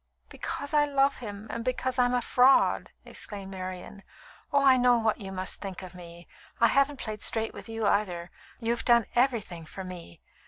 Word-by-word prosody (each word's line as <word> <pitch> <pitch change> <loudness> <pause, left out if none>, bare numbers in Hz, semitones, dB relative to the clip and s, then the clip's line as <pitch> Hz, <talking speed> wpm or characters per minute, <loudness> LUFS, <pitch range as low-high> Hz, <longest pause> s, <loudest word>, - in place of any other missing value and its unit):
"Because 285 +2 -4
I 295 -1 +5
love 275 -1 +2
him, 210 -3 -7
and 230 - -4
because 255 +1 -1
I'm 245 0 +3
a 245 - 0
fraud!" 255 +3 +4 0.2
exclaimed 195 -2 -7
Marian. 185 +1 -7 0.5
"Oh! 285 -1 +3
I 265 -1 +7
know 245 -1 +4
what 220 -1 0
you 195 -1 -6
must 185 0 -3
think 195 -2 -6
of 185 -1 -9
me. 170 -1 -11 0.3
I 235 - +5
haven't 275 +1 +2
played 215 -4 -6
straight 225 0 0
with - - -10
you, 225 -1 -2
either. 180 -4 0 0.3
You've 235 0 -1
done 235 -2 +4
everything 230 -9 0
for 190 +5 -8
me. 175 - -9
225 Hz, 185 wpm, -28 LUFS, 185-250 Hz, 0.5 s, I